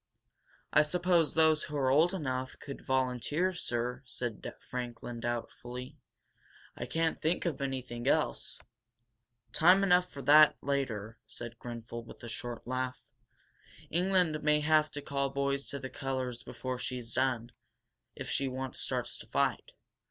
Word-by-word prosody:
"I - - +8
suppose 170 +1 +2
those 160 -1 +4
who 150 - -4
are 130 -2 +3
old 160 +6 +5
enough 130 -8 -3
could 140 - -7
volunteer, 130 +7 +1
sir," 125 -6 -2
said 120 -4 -4
Franklin, 120 -1 -5
doubtfully. 120 +1 -5 0.8
"I - - -5
can't 165 0 0
think 165 +4 0
of 155 -5 -1
anything 130 -3 -3
else - - +1 0.5
" 120 0 -44
"Time 185 +4 +7
enough 180 -1 +4
for 140 - -7
that 150 +1 +8
later," 115 -6 -2
said 120 +2 -7
Grenfel, 120 -1 -6
with 115 - -13
a 120 - -6
short 120 0 -6
laugh. 130 +1 -2 0.9
"England 180 -3 +2
may 150 0 +3
have 155 0 +4
to 145 - -5
call 140 -1 0
boys 140 0 -1
to 140 - -3
the 130 -1 -5
colors 130 -3 -3
before 130 -1 -5
she's 120 -2 -5
done, 125 -2 +1 0.6
if - - -6
she 135 - 0
once 130 0 -4
starts - - -2
to - - -11
fight. - - 0
130 Hz, 145 wpm, -32 LUFS, 120-150 Hz, 0.9 s, I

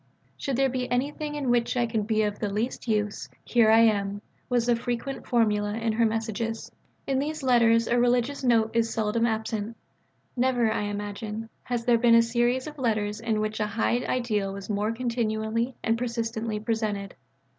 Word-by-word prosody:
"Should 275 -3 -3
there 270 +2 +3
be 255 -1 -3
anything 295 +4 -2
in 275 -4 0
which 240 +1 +1
I 240 - +3
can 225 -2 -1
be 215 +1 +1
of 210 -1 -2
the 210 -2 -2
least 225 +5 -3
use, 210 -2 -1 0.2
here 235 -3 +4
I 225 +1 +7
am": 200 -3 +3
this 205 - -8 0.3
was 245 -1 +1
a 240 - +5
frequent 245 +3 -4
formula 210 -3 +1
in 225 -1 -1
her 230 +1 +3
messages. 225 0 -3 0.3
In 270 -1 0
these 305 +1 -3
letters 230 -2 +4
a 240 +1 +2
religious 245 +3 +1
note 225 -3 +3
is 230 -1 +1
seldom 225 +1 +1
absent. 220 0 -3 0.6
Never, 245 -3 +2
I 210 - -1
imagine, 205 +2 -5 0.2
has 240 -2 -2
there 240 -2 +4
been 235 -1 +5
a 230 - +7
series 240 +2 +1
of 300 -1 -9
letters 215 -4 0
in 225 -1 -1
which 215 +1 -2
a 210 - 0
high 225 +3 +1
ideal 215 -6 0
was 200 +2 -6
more 210 +2 0
continually 230 0 -1
and 225 +1 +1
persistently 230 -2 -2
presented. 215 -3 -2
230 Hz, 185 wpm, -26 LUFS, 215-245 Hz, 0.6 s, I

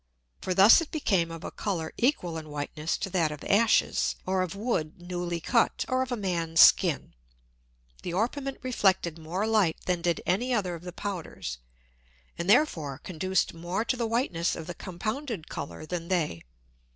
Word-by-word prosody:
For 185 - -2
thus 200 - +8
it 330 - -5
became 195 - +1
of 165 0 -8
a - - -5
Colour 170 -6 -3
equal 230 - +1
in 155 -1 -6
Whiteness 150 +2 -3
to 195 - -4
that 165 -4 +1
of 150 - -8
Ashes, 220 +2 +3
or 185 0 +1
of 185 0 -3
Wood 200 -6 -2
newly 175 -1 -3
cut, 230 +7 +1
or 255 0 +1
of 260 0 -3
a 245 - -1
Man's 170 -5 -1
Skin. - - +6 0.9
The - - -4
Orpiment 265 +8 -1
reflected 190 -9 +1
more 175 +6 -2
Light 215 -7 +2
than 180 -2 0
did 170 -1 +1
any 240 +8 +1
other 190 -5 -1
of 170 - -7
the 180 - -5
Powders, 170 - -5 0.8
and 170 +2 -4
therefore 165 - +3
conduced 185 +2 -1
more 175 +6 -3
to 255 - 0
the 235 -2 -1
Whiteness 220 -8 0
of 165 - -7
the 175 - -5
compounded 215 - -5
Colour 140 +2 -6
than 170 0 -4
they. 160 - -1
180 Hz, 175 wpm, -28 LUFS, 165-220 Hz, 0.9 s, thus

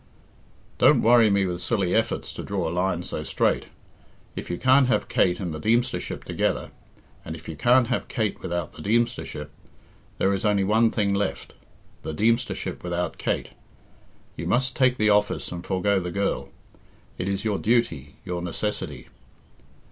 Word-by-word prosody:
"Don't - - +5
worry 115 -1 +6
me 100 -1 +2
with 90 -1 -3
silly 90 -3 0
efforts 110 0 0
to - - -6
draw - - -2
a 80 - -3
line 90 -1 0
so - - -4
straight. - - 0 0.7
If - - -6
you 85 - -2
can't 130 +3 +5
have 125 - +1
Kate 90 -1 +2
and 90 -4 -3
the 75 - -5
Deemstership 115 +7 0
together, - - -1 0.5
and 80 - -6
if 80 - -12
you 80 - -5
can't 120 - +4
have 120 +1 -2
Kate 110 -3 -2
without 85 -2 -3
the - - -10
Deemstership, 105 -8 -1 0.7
there 95 - +2
is 95 - -2
only 105 -2 +2
one 110 +3 +4
thing 100 -3 0
left 100 -1 -2 0.5
the 80 - -5
Deemstership 115 +6 0
without 90 0 -3
Kate. - - -1 0.9
You - - -5
must 125 +2 +1
take 130 -1 +3
the 105 0 +3
office 105 0 +1
and 90 -1 -6
forego 95 +2 +1
the 90 -1 -4
girl. 100 +3 -1 0.7
It 90 - -2
is 100 +2 -2
your 105 -3 0
duty, 95 - 0
your 90 -1 -3
necessity." 90 +5 -3
100 Hz, 165 wpm, -25 LUFS, 90-115 Hz, 0.9 s, worry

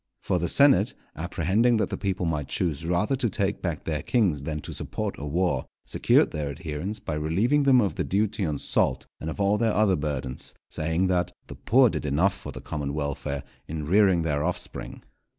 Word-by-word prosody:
For 90 - +1
the 85 - -1
senate, 140 -1 +5 0.2
apprehending 95 +8 +1
that 110 - 0
the - - -1
people 95 -2 -1
might 75 -4 -1
choose 80 -2 -1
rather 100 +9 +1
to 125 -3 0
take 100 0 -1
back 85 -4 -3
their 75 -2 -2
kings 95 - +1
than 75 +2 -3
to - - -7
support - - -3
a 75 - -5
war, 85 -3 0 0.2
secured - - +3
their 75 -2 -3
adherence 80 +6 -4
by 80 - -5
relieving 95 - +2
them 130 -2 +6
of 100 -5 +1
the - - -2
duty 100 +1 0
on 75 -4 -1
salt - - 0
and 80 - -4
of 80 - -6
all 100 +1 +2
their 110 -2 +2
other 105 -3 +4
burthens; 70 -4 -4 0.2
saying 80 +4 0
that 90 -1 0
"_the - - -8
poor 125 0 +5
did 75 -2 -3
enough 85 +8 +2
for - - -8
the - - -8
common 70 -2 -4
welfare 70 -1 -3 0.2
in 75 -1 -4
rearing 95 0 +4
their 75 -2 0
offspring. 90 +1 -4
85 Hz, 200 wpm, -26 LUFS, 75-100 Hz, 0.2 s, them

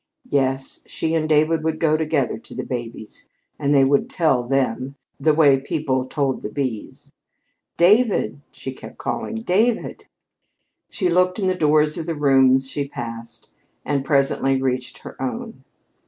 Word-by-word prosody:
Yes, 135 -1 0
she 160 0 -2
and 155 -1 0
David 155 +1 +3
would 160 0 -1
go 155 -1 +3
together 155 -7 0
to - - -12
the - - -3
babies, 120 -3 -6 0.3
and 140 -1 0
they 140 -2 +5
would 140 +1 +2
"tell 135 -7 +2
them," 130 +1 -1 0.2
the 155 - +3
way 145 -3 +5
people 135 -2 -2
"told 135 -1 -1
the - - -5
bees." 125 -3 -5 0.7
"David!" 190 - +3
she 130 0 -7
kept - - -12
calling. 225 - -4
"David!" 225 +2 0 0.8
She 185 - -1
looked 180 +1 +2
in 200 - -1
the 185 - +2
doors 155 -3 +2
of 160 - -5
the 165 - -2
rooms 135 -2 +4
she 140 -1 -2
passed, 115 -3 -7 0.4
and 140 -1 0
presently 135 -1 +2
reached 130 -1 -2
her - - -10
own. 225 - -5
140 Hz, 155 wpm, -22 LUFS, 130-160 Hz, 0.8 s, they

